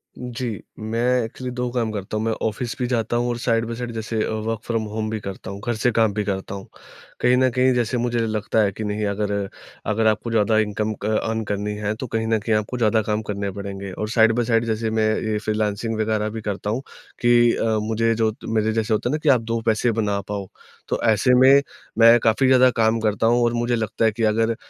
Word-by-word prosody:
जी, 125 Hz, 0 st, -5 dB, 0.3 s
मैं 110 Hz, +2 st, -2 dB, 0.2 s
एक्चुअली 125 Hz, +2 st, -6 dB
2 125 Hz, 0 st, -2 dB
काम 115 Hz, -3 st, -1 dB
करता 105 Hz, 0 st, -4 dB
हूँ 110 Hz, -, -1 dB
मैं 115 Hz, -, +1 dB, 0.2 s
ऑफ़िस 115 Hz, +3 st, -4 dB
भी 125 Hz, -, 0 dB
जाता 120 Hz, -1 st, -1 dB
हूँ 120 Hz, 0 st, 0 dB
और 120 Hz, -, -2 dB
साइड 115 Hz, -1 st, +1 dB
बाई 115 Hz, -, -5 dB
साइड 120 Hz, 0 st, -5 dB
जैसे 110 Hz, 0 st, -3 dB
अ, -, -, -2 dB
वर्क़ 110 Hz, 0 st, -2 dB
फ़्रॉम 115 Hz, -2 st, 0 dB
होम 110 Hz, 0 st, -2 dB
भी 110 Hz, -1 st, -3 dB
करता 100 Hz, -1 st, -7 dB
हूँ, 100 Hz, -, -7 dB
घर 120 Hz, -, 0 dB
से 120 Hz, +3 st, +1 dB
काम 110 Hz, -2 st, +2 dB
भी 105 Hz, 0 st, -1 dB
करता 95 Hz, 0 st, -3 dB
हूँ। 95 Hz, -, -9 dB, 0.5 s
कहीं 125 Hz, +1 st, +4 dB
न 130 Hz, 0 st, +4 dB
कहीं 130 Hz, 0 st, +3 dB
जैसे 120 Hz, 0 st, 0 dB
मुझे 120 Hz, 0 st, 0 dB
लगता 110 Hz, 0 st, -1 dB
है 100 Hz, -, +1 dB
कि 110 Hz, -, -6 dB
नहीं, 105 Hz, 0 st, -2 dB
अगर 100 Hz, 0 st, -2 dB, 0.6 s
अगर 110 Hz, +1 st, +2 dB
आपको 110 Hz, +2 st, 0 dB
ज़्यादा 110 Hz, 0 st, +2 dB
इनकम 105 Hz, 0 st, -1 dB
क -, -, -2 dB, 0.2 s
अर्न 110 Hz, 0 st, -1 dB
करनी 105 Hz, 0 st, -3 dB
है 105 Hz, 0 st, -2 dB
तो 130 Hz, +3 st, -6 dB
कहीं 110 Hz, 0 st, -2 dB
न 110 Hz, 0 st, +2 dB
कहीं 110 Hz, +1 st, 0 dB
आपको 105 Hz, +4 st, -2 dB
ज़्यादा 110 Hz, -1 st, +2 dB
काम 105 Hz, +1 st, -1 dB
करने 100 Hz, -1 st, -2 dB
पड़ेंगे 100 Hz, -1 st, -6 dB
और 105 Hz, +3 st, -4 dB
साइड 115 Hz, -1 st, +4 dB
बाई 120 Hz, -1 st, +1 dB
साइड 115 Hz, 0 st, +2 dB
जैसे 110 Hz, 0 st, -1 dB
मैं 110 Hz, -1 st, +2 dB
ये 110 Hz, -1 st, -1 dB
फ़्रीलान्सिंग 110 Hz, +1 st, -1 dB
वगैरह 110 Hz, 0 st, 0 dB
भी 110 Hz, 0 st, -6 dB
करता 105 Hz, 0 st, -3 dB
हूँ, 120 Hz, +5 st, -1 dB, 0.4 s
कि 120 Hz, -1 st, +5 dB
अ, -, -, -1 dB, 0.2 s
मुझे 115 Hz, +1 st, +1 dB
जो 110 Hz, -1 st, +1 dB
मेरे 110 Hz, 0 st, +1 dB
जैसे 110 Hz, -1 st, 0 dB
होता 115 Hz, +3 st, 0 dB
है -, -, -1 dB
ना 155 Hz, -, +1 dB
कि 150 Hz, -, +3 dB
आप 125 Hz, -4 st, +5 dB
2 115 Hz, 0 st, -2 dB
पैसे 115 Hz, +2 st, +2 dB
बना 105 Hz, -2 st, 0 dB
पाओ, 100 Hz, -2 st, -4 dB, 0.4 s
तो -, -, -1 dB
ऐसे 115 Hz, +3 st, +3 dB
में, 135 Hz, +2 st, +7 dB, 0.4 s
मैं 115 Hz, +1 st, +8 dB
काफ़ी 115 Hz, +4 st, +3 dB
ज़्यादा 130 Hz, 0 st, +6 dB
काम 115 Hz, -1 st, +2 dB
करता 110 Hz, 0 st, +1 dB
हूँ 120 Hz, +1 st, +3 dB
और 120 Hz, 0 st, +2 dB
मुझे 120 Hz, +1 st, 0 dB
लगता 115 Hz, 0 st, -1 dB
है 110 Hz, -, +4 dB
कि 115 Hz, +1 st, -4 dB
अगर 115 Hz, +1 st, +2 dB
110 Hz, 240 wpm, -22 LUFS, 105-120 Hz, 0.6 s, मैं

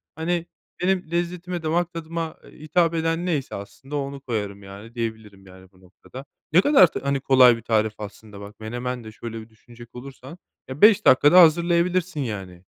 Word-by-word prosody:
Hani, 170 Hz, +1 st, -2 dB, 0.4 s
benim 185 Hz, -3 st, -1 dB
lezzetime, 175 Hz, 0 st, -3 dB
damak 170 Hz, +2 st, -1 dB
tadıma, 165 Hz, 0 st, -5 dB
eee, -, -, -17 dB
hitap 165 Hz, +2 st, +1 dB
eden 165 Hz, +1 st, -1 dB
neyse 155 Hz, -7 st, -2 dB
aslında 135 Hz, +8 st, -9 dB
onu 140 Hz, -1 st, -5 dB
koyarım, 105 Hz, -5 st, -5 dB
yani, 100 Hz, +5 st, -12 dB
diyebilirim, 110 Hz, -4 st, -6 dB
yani, 95 Hz, 0 st, -16 dB
bu 95 Hz, 0 st, -25 dB
noktada. 110 Hz, +8 st, -13 dB, 0.3 s
Ne 180 Hz, -, +6 dB
kadar 275 Hz, -, +6 dB
t -, -, -6 dB
hani, 140 Hz, 0 st, -1 dB
kolay 130 Hz, -3 st, +5 dB
bir -, -, -11 dB
tarif 110 Hz, -1 st, 0 dB
aslında, 105 Hz, 0 st, -10 dB
bak, 100 Hz, +2 st, -12 dB
menemen 120 Hz, +2 st, -5 dB
de 110 Hz, -, -10 dB
şöyle 115 Hz, +1 st, -8 dB
bir 110 Hz, -, -15 dB
düşünecek 120 Hz, +2 st, -17 dB
olursan, 135 Hz, +5 st, -11 dB, 0.3 s
ya, 130 Hz, +3 st, -8 dB
5 210 Hz, -1 st, +6 dB
dakikada 145 Hz, +7 st, +7 dB
hazırlayabilirsin, 170 Hz, +1 st, +2 dB
yani. 95 Hz, -7 st, -6 dB
135 Hz, 175 wpm, -23 LUFS, 110-170 Hz, 0.4 s, dakikada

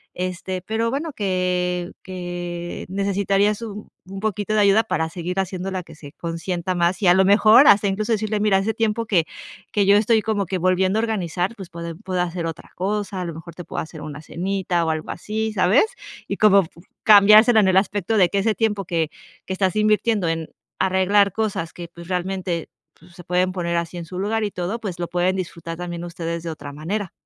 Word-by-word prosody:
este, 185 Hz, +1 st, -4 dB
pero 220 Hz, +4 st, -1 dB
bueno, 300 Hz, +5 st, -3 dB
que 180 Hz, -3 st, -1 dB
que 175 Hz, -1 st, -6 dB
necesitarías 200 Hz, +2 st, +1 dB
un 210 Hz, -2 st, -8 dB, 0.2 s
un 195 Hz, +1 st, -8 dB
poquito 210 Hz, 0 st, -2 dB
de 215 Hz, -, +3 dB
ayuda 205 Hz, +2 st, +5 dB
para 160 Hz, -5 st, -1 dB
seguir 180 Hz, +2 st, -4 dB
haciéndola, 190 Hz, 0 st, -3 dB
que 165 Hz, -, -14 dB
se 145 Hz, -2 st, -12 dB
consienta 170 Hz, +3 st, -3 dB
más 175 Hz, +3 st, +1 dB
y 195 Hz, -, +2 dB
a 175 Hz, -, +8 dB
lo 190 Hz, 0 st, +4 dB
mejor 215 Hz, +6 st, +7 dB
hasta 200 Hz, 0 st, +6 dB
incluso 210 Hz, +4 st, -1 dB
decirle: 215 Hz, -1 st, 0 dB
"Mira, 205 Hz, -2 st, +3 dB
hace 200 Hz, +3 st, 0 dB
tiempo 225 Hz, 0 st, 0 dB
que 175 Hz, -7 st, +2 dB, 0.5 s
que 205 Hz, -1 st, +2 dB
yo 200 Hz, -, +7 dB
estoy 220 Hz, +1 st, +3 dB
como 205 Hz, -2 st, -1 dB
que 190 Hz, -, -2 dB
volviendo 185 Hz, +3 st, +2 dB
a -, -, +2 dB
organizar, 190 Hz, -2 st, -2 dB
pues 190 Hz, -5 st, -10 dB
puedo 170 Hz, +2 st, -4 dB
hacer 175 Hz, -1 st, -3 dB
otra 165 Hz, -2 st, -7 dB
cosa. 200 Hz, 0 st, -2 dB
A -, -, -3 dB
lo 170 Hz, -, -5 dB
mejor 165 Hz, +1 st, -10 dB
te 175 Hz, -, -8 dB
puedo -, -, -4 dB
hacer 160 Hz, -1 st, -9 dB
una 150 Hz, -1 st, -7 dB
cenita 180 Hz, +1 st, -1 dB
o -, -, 0 dB
algo 155 Hz, 0 st, -4 dB
así", 220 Hz, +4 st, -3 dB
¿sabes? 205 Hz, -, +4 dB, 0.4 s
Y -, -, -3 dB
como 200 Hz, -4 st, +5 dB, 0.4 s
cambiársela 215 Hz, +2 st, +7 dB
en 195 Hz, -, +3 dB
el 190 Hz, -, +3 dB
aspecto 205 Hz, +2 st, +1 dB
de 180 Hz, -3 st, +5 dB
que 200 Hz, -, -1 dB
ese 220 Hz, +2 st, +2 dB
tiempo 210 Hz, -3 st, -1 dB
que 165 Hz, -3 st, -1 dB, 0.4 s
que 190 Hz, -, -2 dB
estás 190 Hz, 0 st, 0 dB
invirtiendo 215 Hz, -2 st, +2 dB
en 165 Hz, -1 st, -2 dB, 0.3 s
arreglar 190 Hz, +1 st, +3 dB
cosas 205 Hz, -7 st, -2 dB
que, 175 Hz, -1 st, -8 dB
pues, 170 Hz, 0 st, -12 dB
realmente, 180 Hz, -2 st, -2 dB, 0.3 s
pues, 170 Hz, +2 st, -19 dB
se 175 Hz, 0 st, -12 dB
pueden 180 Hz, +1 st, +1 dB
poner 170 Hz, -2 st, -2 dB
así 170 Hz, +1 st, -3 dB
en 170 Hz, -, -6 dB
su 180 Hz, +2 st, -7 dB
lugar 215 Hz, +3 st, 0 dB
y 205 Hz, -, -2 dB
todo, 180 Hz, +6 st, -3 dB
pues 185 Hz, -6 st, -5 dB
lo 175 Hz, -, -2 dB
pueden 180 Hz, +2 st, 0 dB
disfrutar 170 Hz, -2 st, -5 dB
también 175 Hz, -1 st, -5 dB
ustedes 170 Hz, -1 st, -5 dB
de 165 Hz, -, -4 dB
otra 145 Hz, -2 st, -8 dB
manera. 175 Hz, +7 st, -4 dB
185 Hz, 205 wpm, -22 LUFS, 175-205 Hz, 0.5 s, a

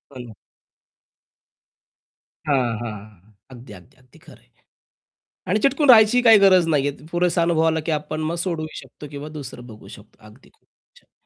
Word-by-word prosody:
हो -, -, -9 dB
ना. 115 Hz, -, -13 dB, 2.1 s
हां, 125 Hz, -6 st, 0 dB
हां. 105 Hz, -3 st, -10 dB, 0.2 s
अगदी, 120 Hz, -3 st, -13 dB
अगदी, 100 Hz, +9 st, -17 dB
अगदी 125 Hz, -1 st, -24 dB
खरं -, -, -17 dB
आहे. -, -, -31 dB, 1.0 s
आणि 200 Hz, -, +1 dB
चिटकून 275 Hz, +2 st, +1 dB
राहायची 225 Hz, +1 st, +6 dB
काही 225 Hz, -3 st, +7 dB
गरज 185 Hz, -3 st, +4 dB
नाहीये. 145 Hz, -3 st, 0 dB, 0.2 s
पुरेसा 175 Hz, -1 st, 0 dB
अनुभवाला 160 Hz, -1 st, +1 dB
की -, -, -2 dB
आपण 155 Hz, +2 st, -4 dB
सोडूही 165 Hz, -3 st, -4 dB
शकतो 150 Hz, -, -14 dB
किंवा 145 Hz, +1 st, -8 dB
दुसरं 125 Hz, -3 st, -10 dB
बघू 110 Hz, -3 st, -14 dB
शकतो. 105 Hz, +1 st, -16 dB
अगदी 105 Hz, -, -19 dB
खूप -, -, -39 dB, 0.3 s
छान. -, -, -28 dB
150 Hz, 150 wpm, -21 LUFS, 120-175 Hz, 2.1 s, काही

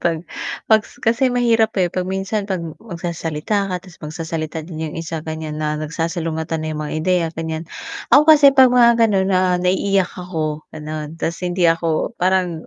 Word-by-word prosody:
'pag 165 Hz, 0 st, -1 dB, 0.4 s
pag 220 Hz, -1 st, +5 dB
sa -, -, -18 dB
kasi 245 Hz, +3 st, +3 dB
mahirap 230 Hz, -2 st, +3 dB
eh, 185 Hz, -, +3 dB
'pag 185 Hz, -, -1 dB
minsan 195 Hz, +2 st, -2 dB
'pag 190 Hz, -, 0 dB, 0.2 s
magsasalita 170 Hz, +1 st, -3 dB
ka -, -, -1 dB
'tas 185 Hz, -3 st, -16 dB
magsasalita 160 Hz, 0 st, -4 dB
din 160 Hz, -2 st, -6 dB
yung -, -, -8 dB
isa 165 Hz, -1 st, -4 dB
ganyan, 155 Hz, -1 st, -5 dB
na 150 Hz, 0 st, -1 dB
nagsasalungatan 160 Hz, 0 st, -3 dB
na 155 Hz, -, -3 dB
yung 155 Hz, -, -3 dB
mga 150 Hz, -, -5 dB
ideya 180 Hz, 0 st, +2 dB
ganyan. 160 Hz, 0 st, -4 dB, 0.5 s
Ako 290 Hz, +4 st, +7 dB
kasi 295 Hz, -3 st, +8 dB
'pag 260 Hz, -2 st, +7 dB
mga 235 Hz, -1 st, +6 dB
gano'n 195 Hz, -3 st, +1 dB
na 185 Hz, -1 st, +3 dB, 0.2 s
naiiyak 190 Hz, +1 st, +1 dB
ako, 155 Hz, -4 st, -4 dB
ganon, 155 Hz, 0 st, -6 dB
'tas 165 Hz, 0 st, -2 dB
hindi 175 Hz, 0 st, 0 dB
ako 165 Hz, +5 st, -1 dB
parang 180 Hz, -3 st, 0 dB
170 Hz, 175 wpm, -20 LUFS, 160-195 Hz, 0.5 s, kasi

